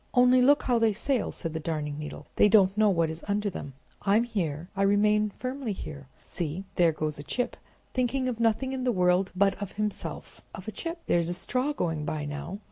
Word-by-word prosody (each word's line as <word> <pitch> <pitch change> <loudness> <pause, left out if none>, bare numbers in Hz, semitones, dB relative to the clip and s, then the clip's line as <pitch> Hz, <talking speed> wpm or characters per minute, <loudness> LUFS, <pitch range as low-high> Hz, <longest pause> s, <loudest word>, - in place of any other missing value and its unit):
"Only 250 0 +6
look 285 +3 +5
how 245 -2 +2
they 225 -2 +3
sail!" 250 +3 0
said 165 -3 -5
the 160 - -2
Darning 150 -2 -3
Needle. 150 0 -7
"They 210 - +5
don't 195 -2 +5
know 215 0 +4
what 165 -4 +2
is 160 +1 -8
under 205 0 0
them! 140 -6 -7 0.3
I'm 205 +3 +3
here, 175 -9 -3
I 195 - -1
remain 210 +1 +3
firmly 255 -3 -3
here. 140 -7 -8 0.2
See, 170 +2 -4
there 170 -2 +4
goes 155 -1 -3
a - - -6
chip 245 +10 -2 0.4
thinking 255 +1 0
of 240 -3 -2
nothing 230 +4 +1
in 260 -1 -3
the 250 - +2
world 180 -1 +2
but 195 +1 +4
of 200 -2 -5
himself—of 210 -1 -5
a - - -2
chip! 335 - -5
There's 170 -1 +2
a 175 - -1
straw 255 +9 -1
going 165 - -2
by 150 -1 -3
now. 145 +6 -5
200 Hz, 210 wpm, -28 LUFS, 165-240 Hz, 0.4 s, Only